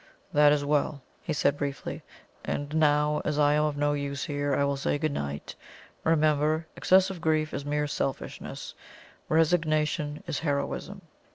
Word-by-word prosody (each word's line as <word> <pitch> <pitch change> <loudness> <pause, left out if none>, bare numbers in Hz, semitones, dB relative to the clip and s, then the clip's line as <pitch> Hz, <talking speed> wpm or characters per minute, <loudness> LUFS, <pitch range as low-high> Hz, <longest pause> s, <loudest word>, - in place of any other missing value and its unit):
"That 150 0 +6
is 145 -1 +1
well," 145 -1 0 0.2
he - - -4
said 145 -1 +1
briefly. 140 -1 -4 0.4
"And 145 +1 -3
now, 150 -1 +3
as 150 -1 -1
I 145 0 +4
am 150 0 +3
of 150 -1 -2
no 145 0 +2
use 140 -1 -3
here, 145 -1 -1
I 140 - +2
will 140 0 +1
say 135 +1 0
good 155 0 -1
night. 70 - -4 0.5
Remember, 155 0 +2
excessive 190 -1 +3
grief 155 -1 +1
is 140 - -4
mere 150 0 0
selfishness; 135 -2 -4 0.6
resignation 155 -2 +1
is 165 -4 -2
heroism." 150 +6 -2
150 Hz, 155 wpm, -28 LUFS, 145-155 Hz, 0.6 s, That